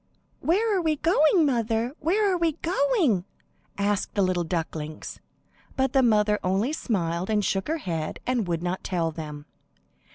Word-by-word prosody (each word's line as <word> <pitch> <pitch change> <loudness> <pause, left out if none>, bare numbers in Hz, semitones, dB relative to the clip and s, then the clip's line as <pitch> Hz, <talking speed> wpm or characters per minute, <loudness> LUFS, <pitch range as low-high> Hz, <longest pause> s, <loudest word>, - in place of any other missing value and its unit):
"Where 415 +6 +2
are 370 - +1
we 315 -2 +1
going, 315 +2 +4
mother? 235 -2 0
Where 390 +5 +2
are - - +2
we 335 -2 +1
going?" 285 - +2 0.5
asked 200 0 -1
the 200 - +3
little 185 -1 +1
ducklings. 160 -2 -4 0.6
But 265 -1 0
the 270 - +5
mother 210 -3 +3
only 195 +10 +1
smiled 180 - -2
and 210 -2 +1
shook 190 +1 -1
her 320 +2 0
head 165 - -4
and 245 -6 0
would 170 -1 -2
not 180 +1 -2
tell 170 -3 -1
them. 150 -2 -7
215 Hz, 160 wpm, -26 LUFS, -, 0.6 s, the